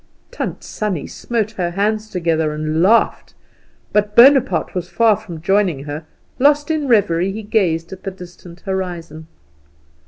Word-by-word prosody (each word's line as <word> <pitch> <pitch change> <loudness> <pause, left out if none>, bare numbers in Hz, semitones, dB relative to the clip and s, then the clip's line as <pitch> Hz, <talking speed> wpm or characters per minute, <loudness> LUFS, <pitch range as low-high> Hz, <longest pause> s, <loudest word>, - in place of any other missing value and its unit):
Tant - - -5
Sannie 205 -8 -3
smote 220 -3 -3
her 180 -5 -2
hands 210 +4 -1
together 165 -5 0
and 155 +1 -1
laughed; 220 +6 +2 0.6
but 210 0 +1
Bonaparte 265 +1 +5
was 180 -1 -4
far 225 0 +3
from 175 -7 -10
joining 190 -7 +1
her. 150 +2 -7 0.3
Lost 290 +3 +3
in 305 -3 -1
reverie, 195 -6 +2
he 215 +2 -6
gazed 175 -6 0
at 190 - -11
the - - -4
distant 180 -1 -13
horizon. 175 -5 -5
190 Hz, 145 wpm, -18 LUFS, 170-220 Hz, 0.6 s, Bonaparte